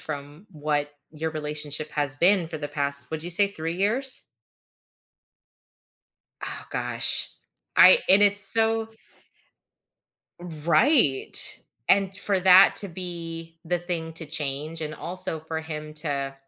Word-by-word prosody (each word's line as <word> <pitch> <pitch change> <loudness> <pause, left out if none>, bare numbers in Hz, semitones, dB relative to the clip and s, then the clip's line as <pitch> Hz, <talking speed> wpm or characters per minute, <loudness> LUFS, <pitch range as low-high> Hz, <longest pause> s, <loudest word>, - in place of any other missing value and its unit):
from 145 +4 -9
what 145 -1 -4 0.2
your 160 +1 -6
relationship 150 0 -5
has 145 -2 0
been 180 +1 +1
for 160 - -8
the 145 -1 -7
past, 140 -1 -2
would 160 -1 -6
you 175 - -6
say 200 +4 +7
3 165 -4 -6
years? 235 +8 -2 2.1
Oh - - -7
gosh. - - -3 0.5
I - - +7
and 195 +2 +5
it's 205 0 +7
so 225 +1 +5 1.5
Right. 170 - 0 0.5
And 195 -1 +1
for 200 -1 0
that 185 +1 +5
to 200 - +1
be 165 -2 -9
the 175 +2 -2
thing 170 -2 -6
to 165 0 -7
change 150 +1 -6
and 155 -1 -6
also 180 -1 0
for 160 0 -7
him 155 -1 -9
to 140 -3 -4
160 Hz, 125 wpm, -23 LUFS, 150-185 Hz, 2.1 s, say